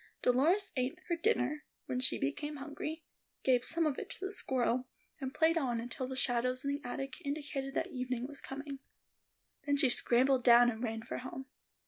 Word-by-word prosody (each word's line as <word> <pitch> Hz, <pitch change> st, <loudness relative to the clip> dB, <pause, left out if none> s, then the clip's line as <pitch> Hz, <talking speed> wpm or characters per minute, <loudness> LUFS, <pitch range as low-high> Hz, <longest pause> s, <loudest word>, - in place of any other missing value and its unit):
Dolores 330 Hz, +11 st, +3 dB
ate 255 Hz, +5 st, -1 dB
her 340 Hz, -, +2 dB
dinner 305 Hz, -, +1 dB, 0.2 s
when 250 Hz, -, -2 dB
she 255 Hz, -, +4 dB
became 295 Hz, -, -2 dB
hungry, 305 Hz, +3 st, -5 dB, 0.4 s
gave 250 Hz, -2 st, +3 dB
some 330 Hz, +4 st, +1 dB
of 295 Hz, -3 st, 0 dB
it -, -, -7 dB
to 385 Hz, -, -6 dB
the 385 Hz, -, -3 dB
squirrel, 255 Hz, -, 0 dB, 0.3 s
and 265 Hz, -2 st, -3 dB
played 325 Hz, +3 st, +3 dB
on 245 Hz, -5 st, -1 dB
until 250 Hz, +2 st, -3 dB
the 260 Hz, -, -5 dB
shadows 255 Hz, +1 st, +2 dB
in 280 Hz, -, +1 dB
the 285 Hz, -, -4 dB
attic 270 Hz, +5 st, -5 dB
indicated 280 Hz, -2 st, -3 dB
that 360 Hz, +3 st, -1 dB
evening 250 Hz, -3 st, -2 dB
was 280 Hz, +1 st, -6 dB
coming. 275 Hz, 0 st, -6 dB, 0.9 s
Then 285 Hz, 0 st, +3 dB
she 270 Hz, -, +5 dB
scrambled 250 Hz, +2 st, +3 dB
down 240 Hz, 0 st, +7 dB
and 220 Hz, 0 st, -7 dB
ran 225 Hz, -2 st, -3 dB
for 230 Hz, -, -5 dB
home. 260 Hz, +1 st, -7 dB
265 Hz, 185 wpm, -33 LUFS, 250-295 Hz, 0.9 s, down